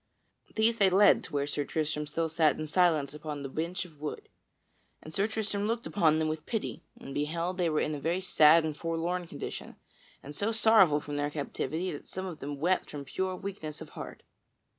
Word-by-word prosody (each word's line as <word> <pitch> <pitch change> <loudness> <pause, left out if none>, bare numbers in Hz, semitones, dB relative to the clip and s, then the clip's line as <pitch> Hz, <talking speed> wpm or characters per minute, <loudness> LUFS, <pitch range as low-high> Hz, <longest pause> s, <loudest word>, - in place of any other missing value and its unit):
These 225 +1 +3
they 195 -3 +5
led 195 +2 +5
to - - -11
where 140 -1 +1
Sir 145 0 -1
Tristram 150 0 -2
still 165 +2 -1
sat 155 -1 +2
in 155 - -3
justice 155 -4 +2
upon 150 -1 -6
the 135 - -4
bench 170 +6 -3
of 155 -4 -17
wood. 150 - -5 0.7
And 155 - -10
Sir 200 +2 +2
Tristram 210 -2 -2
looked 230 +3 -1
upon 160 -6 +3
them 160 0 +1
with 155 0 -4
pity 225 -3 -3 0.2
and 135 - -8
beheld 165 +5 -2
that 180 - +1
they - - +2
were 155 - +1
in 155 - -1
a 145 - -4
very 165 +5 0
sad 165 -3 +6
and 155 -2 -2
forlorn 165 +2 -2
condition - - -7 0.5
and 145 +2 -9
so 205 +8 0
sorrowful 220 -9 +5
from 145 0 -5
their 145 0 0
captivity 160 +4 -3
that 145 - -8
some 190 0 -5
of 175 -5 -6
them 140 0 -5
wept 180 +5 +1
from 145 -1 -7
pure 185 +6 -2
weakness 180 -6 -6
of - - -9
heart. - - -9
160 Hz, 210 wpm, -30 LUFS, 150-185 Hz, 0.7 s, sad